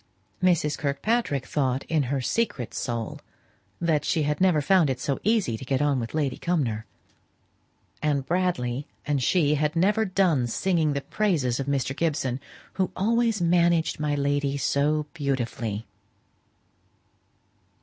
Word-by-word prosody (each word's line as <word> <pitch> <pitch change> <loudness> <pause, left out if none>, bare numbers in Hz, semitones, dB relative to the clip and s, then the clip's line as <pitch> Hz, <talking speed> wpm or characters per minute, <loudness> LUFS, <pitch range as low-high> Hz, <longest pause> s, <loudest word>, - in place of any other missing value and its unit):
Mrs. 170 -5 +2
Kirkpatrick 145 - 0
thought 130 -2 0
in 160 -2 0
her 135 -1 0
secret 205 - -1
soul 115 -2 -3 0.6
that 160 -3 +1
she 160 - +1
had 150 +2 -1
never 180 -5 +4
found 165 +1 +3
it 130 -1 -2
so 140 +1 -2
easy 205 - +1
to - - -9
get 130 0 0
on 145 -2 +2
with 115 +4 -5
Lady 145 -4 0
Cumnor; 120 - -1 1.1
and 145 -3 0
Bradley 145 -6 -1 0.2
and 145 -3 0
she 150 +2 +3
had 150 +2 0
never 205 +6 +3
done 180 - +2
singing 160 +3 +1
the 140 - -2
praises 140 - 0
of 135 - -3
Mr. 135 -1 -1
Gibson, 140 -6 -1 0.3
"who 185 -2 -1
always 225 -1 +1
managed 170 -2 +2
my 150 -1 0
lady 140 0 0
so 150 +2 +1
beautifully." 120 -8 -2
150 Hz, 140 wpm, -26 LUFS, 135-175 Hz, 1.1 s, never